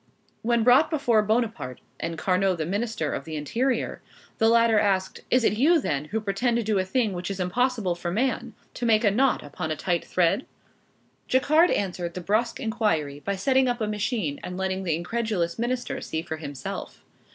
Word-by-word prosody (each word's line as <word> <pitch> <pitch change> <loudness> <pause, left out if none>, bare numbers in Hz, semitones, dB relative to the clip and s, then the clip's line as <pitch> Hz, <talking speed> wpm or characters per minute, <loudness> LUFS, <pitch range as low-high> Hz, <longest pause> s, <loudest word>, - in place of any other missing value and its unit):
When 235 0 +2
brought 250 +6 +6
before 245 -9 +2
Bonaparte, 215 - -1 0.2
and 165 0 -3
Carnot 185 +1 +1
the 155 - -2
Minister 200 -4 -2
of - - -3
the 155 +2 -6
Interior, 235 - -1 0.4
the 225 - +5
latter 230 -1 +5
asked, 190 -2 0
"Is 250 0 +3
it 215 - +2
you 325 +5 +5
then, 145 - -2
who 210 +8 -2
pretend 220 +4 0
to 235 - 0
do 210 -2 +1
a - - +2
thing 215 +2 0
which 180 +1 -4
is 195 -1 -4
impossible 220 +1 0
for 175 0 -4
man, 245 +9 -1 0.2
to 240 - -2
make 220 -1 +4
a 205 - +4
knot 260 +5 +2
upon 145 +2 -5
a 155 - -1
tight 175 +1 -1
thread?" 180 +8 +1 0.8
Jacquard 310 +7 +4
answered 180 -3 -2
the - - -3
brusque 215 +6 0
inquiry 210 - -1
by 200 - -1
setting 260 +6 +2
up 245 0 0
a 220 - 0
machine, 210 - -2
and 180 0 -5
letting 190 0 -2
the 165 -3 +1
incredulous 185 0 -2
minister 245 +1 -2
see 160 0 -3
for 160 - -5
himself. 145 -4 -7
210 Hz, 190 wpm, -26 LUFS, 175-240 Hz, 0.8 s, brought